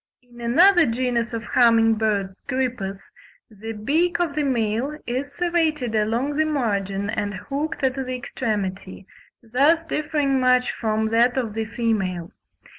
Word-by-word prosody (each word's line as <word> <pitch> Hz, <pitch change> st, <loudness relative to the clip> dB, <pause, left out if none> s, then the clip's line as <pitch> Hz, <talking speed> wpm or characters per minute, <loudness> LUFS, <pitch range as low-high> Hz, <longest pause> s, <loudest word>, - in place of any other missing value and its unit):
In 240 Hz, -1 st, -15 dB
another 340 Hz, +9 st, +5 dB
genus 235 Hz, 0 st, -1 dB
of 230 Hz, -1 st, -4 dB
humming 230 Hz, -2 st, +4 dB
birds 205 Hz, -3 st, -1 dB
(Grypus), 245 Hz, -7 st, -2 dB, 0.5 s
the 220 Hz, +2 st, -7 dB
beak 315 Hz, +12 st, 0 dB
of 340 Hz, -4 st, 0 dB
the 300 Hz, -, -1 dB
male 250 Hz, +1 st, -1 dB
is 260 Hz, +4 st, -3 dB
serrated 320 Hz, -8 st, 0 dB
along 230 Hz, +7 st, 0 dB
the 315 Hz, -, +3 dB
margin 200 Hz, -8 st, -1 dB
and 205 Hz, 0 st, -2 dB
hooked 285 Hz, +9 st, -4 dB
at 260 Hz, -1 st, +2 dB
the 255 Hz, -1 st, -4 dB
extremity, 200 Hz, -6 st, -4 dB, 0.4 s
thus 285 Hz, +9 st, +2 dB
differing 295 Hz, -4 st, 0 dB
much 255 Hz, 0 st, +3 dB
from 220 Hz, -1 st, -1 dB
that 235 Hz, +3 st, +3 dB
of 230 Hz, -5 st, -1 dB
the 225 Hz, 0 st, -2 dB
female. 195 Hz, -7 st, -2 dB
240 Hz, 140 wpm, -23 LUFS, 215-280 Hz, 0.5 s, another